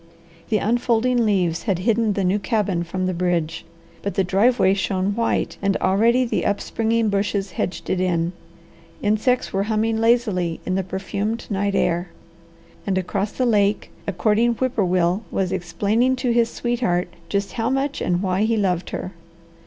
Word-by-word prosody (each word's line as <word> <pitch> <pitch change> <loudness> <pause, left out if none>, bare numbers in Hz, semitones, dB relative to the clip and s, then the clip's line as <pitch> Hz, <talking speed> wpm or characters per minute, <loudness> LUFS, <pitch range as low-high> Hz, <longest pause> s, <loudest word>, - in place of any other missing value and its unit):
The 215 - +3
unfolding 240 +2 +1
leaves 180 -5 +1
had 190 - +2
hidden 220 +3 +1
the 195 - -1
new 185 +3 +2
cabin 200 -3 0
from 185 +2 -3
the 185 - 0
bridge, 170 -2 -1 0.4
but 200 - -3
the 195 - +2
driveway 195 +2 +3
shone 195 0 0
white, 230 0 0
and 195 -1 +1
already 230 +7 +3
the 230 - -1
upspringing 225 +2 0
bushes 200 -1 -1
hedged 175 - -3
it 185 - 0
in. 175 -1 0 0.7
Insects 215 +4 +1
were 195 - +1
humming 220 +1 +1
lazily 220 -8 +1
in 185 - -1
the 190 - +1
perfumed 200 +4 -3
night 200 0 0
air, 175 +1 0 0.8
and 190 -1 +1
across 195 +3 -1
the 255 - 0
lake 210 -3 +1 0.2
a - - +1
courting 215 +6 +2
whip 255 +1 -1
poor 205 - +2
will 180 +2 +1
was 185 -2 -1
explaining 205 +8 +1
to 250 -1 -1
his 235 -1 +3
sweetheart 235 -9 -1 0.2
just 200 0 -1
how 230 0 -1
much 270 +2 -1
and 175 +2 0
why 185 0 0
he 225 +1 +2
loved 185 -4 0
her. 185 - -5
200 Hz, 170 wpm, -22 LUFS, 185-230 Hz, 0.8 s, The